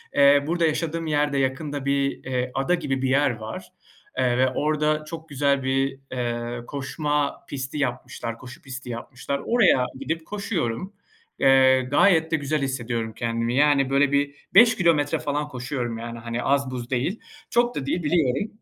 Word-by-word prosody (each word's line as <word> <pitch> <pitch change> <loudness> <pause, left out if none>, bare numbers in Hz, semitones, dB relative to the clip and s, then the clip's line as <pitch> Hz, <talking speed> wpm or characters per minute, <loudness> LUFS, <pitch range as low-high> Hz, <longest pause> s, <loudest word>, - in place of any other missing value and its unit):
eee, 140 0 +6
burada 170 +1 +1
yaşadığım 165 +1 -1
yerde 145 -2 +1
yakında 135 +1 -2
bir, 140 0 0
eee, 125 -1 -2
ada 135 +7 +1
gibi 135 -6 -2
bir 135 - 0
yer 140 +2 +3
var, 110 0 -8 0.5
eee, 125 -1 +2
ve 130 0 +3
orada 150 +2 0
çok 160 0 -8
güzel 140 -1 +1
bir, 135 +1 0
eee, 120 -1 -3
koşma 145 +1 -2
pisti 135 +1 -4
yapmışlar, 125 -3 -3
koşu 125 +1 -12
pisti 130 -2 -8
yapmışlar. 125 +4 -5
Oraya 200 - +4
gidip 160 0 -3
koşuyorum. 190 - -3 0.5
Eee, 130 -1 +5
gayet 160 +5 +3
de - - +3
güzel 150 0 -1
hissediyorum 120 -4 -2
kendimi. 115 +1 -1
Yani, 140 -1 +4
böyle, 140 +1 +3
bir 140 0 +1 0.2
5 225 +3 +8
kilometre 160 -5 +2
falan 145 +1 -2
koşuyorum, 125 -3 -4
yani, 115 0 -6
hani, 115 +1 -4
az 140 -1 +1
buz 125 -2 -5
değil. 135 - -1 0.3
Çok 240 +1 +2
da 135 - -3
değil 170 +5 -1
biliyorum. 155 - +1
140 Hz, 160 wpm, -24 LUFS, 125-150 Hz, 0.5 s, 5